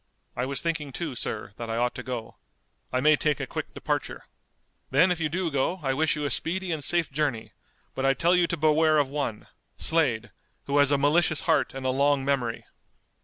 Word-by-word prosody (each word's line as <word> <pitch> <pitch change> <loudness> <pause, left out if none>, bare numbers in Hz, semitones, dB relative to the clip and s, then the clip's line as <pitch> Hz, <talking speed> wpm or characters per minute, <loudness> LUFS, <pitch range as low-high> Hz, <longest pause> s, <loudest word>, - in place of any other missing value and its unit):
"I 125 +1 -2
was 135 0 -2
thinking, 160 -4 -2
too, 160 +1 -4
sir, 105 -4 -4
that 115 -1 -6
I 115 - -2
ought 120 +1 +1
to - - -6
go. 120 -3 -6 0.5
I 130 - 0
may 150 +2 +6
take 150 -2 0
a - - -2
quick - - -5
departure." - - -3 0.6
"Then 165 +8 +4
if 175 - -1
you 155 -2 0
do 170 +1 -2
go 140 +7 0
I 135 -1 +1
wish 155 +3 +1
you 150 -1 -3
a 145 - -1
speedy 185 +2 0
and 155 -3 -2
safe 170 +1 +1
journey, 135 -6 -2 0.4
but 135 - -4
I 135 0 +3
tell 175 +2 +3
you 175 -1 +3
to 170 - -2
beware 155 +1 +3
of 140 -2 +1
one, 140 -7 -3 0.3
Slade, 125 -9 +1 0.3
who 140 +1 +1
has 140 -1 +5
a 145 - +3
malicious 155 +2 +2
heart 165 -6 +1
and 135 -1 -6
a 130 - +2
long 140 +1 +2
memory." 130 -5 -1
145 Hz, 215 wpm, -26 LUFS, 130-160 Hz, 0.6 s, may